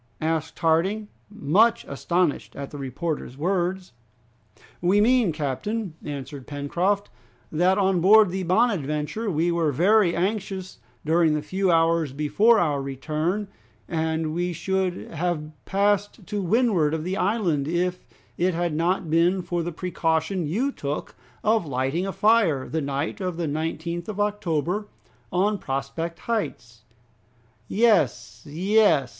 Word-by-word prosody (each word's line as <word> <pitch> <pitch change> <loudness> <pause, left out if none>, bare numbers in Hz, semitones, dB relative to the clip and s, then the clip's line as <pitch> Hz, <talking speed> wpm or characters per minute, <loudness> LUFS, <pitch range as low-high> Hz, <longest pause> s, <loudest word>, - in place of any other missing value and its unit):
asked 160 0 -1
Harding, 190 +7 +1 0.2
much 210 +3 +2
astonished 170 +3 -1
at 140 -1 -6
the 145 - -8
reporter's 140 0 -4
words. 180 0 -1 0.9
"We 185 +4 +3
mean, 235 -3 +4
captain," 160 - -3
answered 140 -2 -7
Pencroft, 175 +8 -1 0.4
"that 180 +4 +3
on 190 -3 +2
board 210 +1 +6
the 190 +1 -2
'Bonadventure' 180 - 0
we 170 0 +1
were 165 -3 +1
very 185 - +3
anxious 190 0 -3 0.3
during 160 0 +3
the 150 - -2
few 190 +5 0
hours 165 -3 +2
before 200 +11 +3
our 150 -7 +1
return, 155 +9 -2 0.4
and 160 -1 -1
we 175 +1 -1
should 185 +2 -2
have 165 -2 -2
passed 200 +1 0
to 205 +1 -3
windward 190 -6 +2
of 155 - -4
the 185 +3 -2
island, 180 -8 0
if 180 +2 -1 0.4
it 180 0 +2
had 175 -1 -1
not 175 +3 0
been 170 +4 +2
for 175 0 -2
the 170 +1 -3
precaution 165 0 -1
you 235 - 0
took 145 - -5 0.3
of 215 -5 +2
lighting 135 +7 -1
a - - -2
fire 200 -11 +3
the 160 - -2
night 140 +6 -3
of 180 -3 -3
the 170 - -1
19th 165 +3 -3
of 210 -1 -5
October, 205 -1 -1 0.4
on 200 +3 +1
Prospect 160 +6 -4
Heights." 120 - -4 0.8
"Yes, 180 - +1
yes! 185 - +3
175 Hz, 135 wpm, -24 LUFS, 155-195 Hz, 0.9 s, board